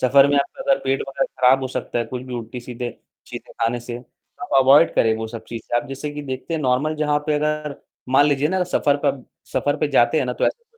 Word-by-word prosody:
सफर 135 Hz, +2 st, +6 dB
में 145 Hz, -, +2 dB
आपका 265 Hz, -, -3 dB
अगर 275 Hz, 0 st, +2 dB
पेट 135 Hz, 0 st, 0 dB
वगैरह 135 Hz, 0 st, -1 dB
खराब 130 Hz, +1 st, +5 dB
हो 130 Hz, -, -2 dB
सकता 125 Hz, -1 st, -3 dB
है 120 Hz, -, 0 dB
कुछ 125 Hz, +2 st, -6 dB
भी 125 Hz, -1 st, -7 dB
उल्टी-सीधे 120 Hz, +1 st, -6 dB, 0.4 s
चीजें -, -, -9 dB
खाने 115 Hz, +1 st, 0 dB
से, 120 Hz, 0 st, -6 dB, 0.5 s
आप 180 Hz, -, -5 dB
अवॉइड 140 Hz, +5 st, +6 dB
करें 110 Hz, -1 st, +3 dB
वो 110 Hz, 0 st, -4 dB
सब 115 Hz, -1 st, -8 dB
चीजें। 115 Hz, +1 st, -3 dB
आप -, -, -11 dB
जैसे 135 Hz, +2 st, -5 dB
कि 145 Hz, 0 st, -6 dB
देखते 130 Hz, +4 st, -5 dB
हैं 155 Hz, -, -2 dB
नॉर्मल 135 Hz, +4 st, +1 dB
जहाँ 150 Hz, -1 st, +1 dB
पे 150 Hz, -, +1 dB
अगर 150 Hz, -1 st, -1 dB, 0.3 s
मान 140 Hz, +3 st, +5 dB
लीजिए 145 Hz, +1 st, +1 dB
ना 185 Hz, 0 st, +1 dB
सफर 145 Hz, -5 st, +1 dB
पर 135 Hz, -2 st, 0 dB, 0.3 s
सफर 145 Hz, +2 st, 0 dB
पे 150 Hz, -, 0 dB
जाते 135 Hz, +3 st, +3 dB
हैं 135 Hz, -, +1 dB
ना, 125 Hz, -, -1 dB
तो -, -, 0 dB
ऐसे 470 Hz, -, -3 dB
135 Hz, 240 wpm, -21 LUFS, 125-150 Hz, 0.5 s, सफर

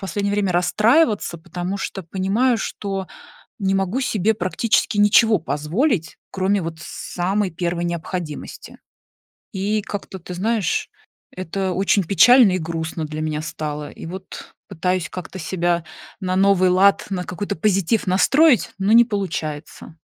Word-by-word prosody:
последнее 200 Hz, +2 st, -2 dB
время 200 Hz, -3 st, 0 dB
расстраиваться, 210 Hz, -, +2 dB
потому 175 Hz, +4 st, -5 dB
что 195 Hz, -, -5 dB
понимаю, 200 Hz, +8 st, 0 dB
что 195 Hz, -3 st, -4 dB, 0.5 s
не 195 Hz, -1 st, +1 dB
могу 195 Hz, +5 st, 0 dB
себе 220 Hz, -4 st, +1 dB
практически 210 Hz, +2 st, 0 dB
ничего 210 Hz, +2 st, +5 dB
позволить, 165 Hz, -, -1 dB
кроме 195 Hz, +1 st, 0 dB
вот 165 Hz, -1 st, -5 dB
самой 185 Hz, +3 st, -2 dB
первой 170 Hz, +1 st, -2 dB
необходимости. 170 Hz, -2 st, -6 dB, 0.8 s
И, 205 Hz, +2 st, -1 dB
как-то, 200 Hz, -2 st, -6 dB
ты 180 Hz, +1 st, -8 dB
знаешь, 210 Hz, -1 st, -1 dB, 0.5 s
это 185 Hz, +1 st, -3 dB
очень 195 Hz, +2 st, +2 dB
печально 220 Hz, +5 st, +6 dB
и -, -, +1 dB
грустно 160 Hz, 0 st, -4 dB
для 155 Hz, 0 st, -6 dB
меня 155 Hz, -1 st, -2 dB
стало, 150 Hz, -1 st, -5 dB
и -, -, -10 dB
вот 185 Hz, +3 st, -9 dB
пытаюсь 180 Hz, -2 st, -2 dB
как-то 185 Hz, +1 st, -8 dB
себя 175 Hz, -1 st, -1 dB, 0.4 s
на 185 Hz, -2 st, -2 dB
новый 190 Hz, -1 st, +4 dB
лад, 190 Hz, +2 st, +4 dB
на 185 Hz, -2 st, -2 dB
какой-то 180 Hz, +3 st, -4 dB
позитив 195 Hz, +3 st, +1 dB
настроить, 260 Hz, -, +4 dB
но 195 Hz, +2 st, +1 dB
не 235 Hz, +1 st, +8 dB
получается. 165 Hz, -7 st, -5 dB
190 Hz, 135 wpm, -21 LUFS, 170-205 Hz, 0.8 s, не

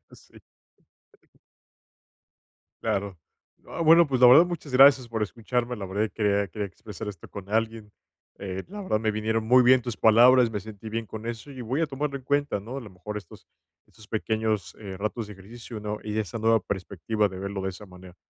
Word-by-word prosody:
Sí. -, -, -17 dB, 2.4 s
Claro. 100 Hz, -2 st, -2 dB, 0.5 s
Ah, -, -, -7 dB
bueno, 165 Hz, 0 st, +6 dB
pues, 130 Hz, -3 st, -1 dB
la 125 Hz, -, +9 dB
verdad, 160 Hz, +8 st, +8 dB
muchas 165 Hz, -6 st, -6 dB
gracias 130 Hz, -2 st, +6 dB
por 110 Hz, -1 st, -2 dB
escucharme. 120 Hz, +3 st, -2 dB
La 100 Hz, -, -6 dB
verdad 100 Hz, +3 st, -1 dB
que 110 Hz, -, -4 dB
quería 100 Hz, -1 st, +1 dB
quería 105 Hz, +3 st, -4 dB
expresar 105 Hz, +2 st, -9 dB
esto 100 Hz, -, -9 dB
con 100 Hz, -1 st, -9 dB
alguien, 110 Hz, -1 st, -1 dB, 0.5 s
eh, 95 Hz, -1 st, -5 dB
la 205 Hz, +2 st, -7 dB
verdad 110 Hz, -, 0 dB
me 110 Hz, -1 st, +1 dB
vinieron 110 Hz, +1 st, -1 dB
muy 125 Hz, +1 st, +6 dB
bien 125 Hz, 0 st, +6 dB
tus 120 Hz, -2 st, -5 dB
palabras. 120 Hz, +2 st, +6 dB
Me 105 Hz, -2 st, -3 dB
sentí 110 Hz, +1 st, -10 dB
bien 115 Hz, +1 st, -3 dB
con 110 Hz, +2 st, -8 dB
eso, 115 Hz, +4 st, -6 dB
y 130 Hz, -2 st, -9 dB
voy 125 Hz, +6 st, -2 dB
a 165 Hz, -, +2 dB
tomarlo 140 Hz, 0 st, -3 dB
en 135 Hz, -, -9 dB
cuenta, 145 Hz, -5 st, 0 dB
¿no?, 120 Hz, +6 st, -8 dB
a -, -, -4 dB
lo 110 Hz, -5 st, -11 dB
mejor 95 Hz, +3 st, -8 dB
estos 105 Hz, -, -10 dB, 0.4 s
estos 110 Hz, -2 st, -18 dB
pequeños, 110 Hz, -1 st, -2 dB
eh, 100 Hz, -3 st, -8 dB
ratos 110 Hz, +2 st, -3 dB
de 105 Hz, -, -10 dB
ejercicio, 110 Hz, +3 st, -10 dB
¿no?, 105 Hz, 0 st, -4 dB
y 105 Hz, 0 st, -4 dB
esa 110 Hz, +2 st, -3 dB
nueva 115 Hz, 0 st, +3 dB
perspectiva 100 Hz, +3 st, -2 dB
de 95 Hz, -1 st, -9 dB
verlo 100 Hz, 0 st, -4 dB
de 95 Hz, -, -2 dB
esa 100 Hz, +3 st, -11 dB
manera. 90 Hz, -1 st, -14 dB
110 Hz, 200 wpm, -26 LUFS, 100-125 Hz, 2.4 s, la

